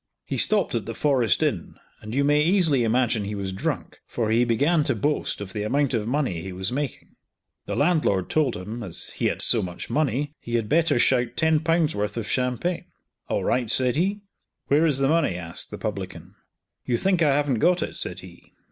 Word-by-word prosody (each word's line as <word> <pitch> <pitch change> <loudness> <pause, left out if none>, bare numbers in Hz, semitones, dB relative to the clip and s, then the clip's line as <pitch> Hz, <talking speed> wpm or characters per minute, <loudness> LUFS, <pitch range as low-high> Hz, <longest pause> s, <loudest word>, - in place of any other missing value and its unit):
He - - -3
stopped 205 -6 +2
at 115 -4 -1
the 115 - -5
Forest 130 - +2
Inn, - - -2 0.3
and 110 +3 -6
you 140 - +2
may 145 +1 +3
easily 160 -6 +3
imagine 115 -1 +1
he 105 +1 -4
was 95 -1 -4
drunk, 95 - -4
for 110 -2 -2
he 115 +2 +4
began 145 +8 +2
to - - +1
boast 145 -7 -1
of 95 -2 -7
the 105 - -3
amount 135 +6 0
of 110 -2 -1
money 125 - -1
he 95 +2 -6
was 95 +2 -3
making. 140 +1 -5 0.5
The - - -2
landlord 145 - +2
told 150 -5 +1
him, 105 +6 -6
as 95 -7 -4
he - - -1
had - - +1
so - - +4
much 90 -2 -6
money, 145 0 0
he 120 - -4
had 115 -2 0
better 165 +2 +2
shout 120 -1 +2
Ł10 160 0 +2
worth 105 +2 -3
of 110 -2 -3
champagne. 130 +9 -1 0.4
"All - - 0
right," 125 -3 0
said 125 +2 +1
he. 195 +6 0 0.5
"Where 150 +4 +4
is 145 -4 +3
the 135 0 +2
money?" 155 - +2
asked 85 -2 -4
the - - -7
publican. - - -6 0.5
"You 120 - 0
think 185 +2 +1
I 145 -4 +4
haven't 140 -5 +1
got 180 +3 +3
it," - - -6
said 90 +1 0
he. 90 -1 -15
130 Hz, 205 wpm, -24 LUFS, 110-150 Hz, 0.5 s, he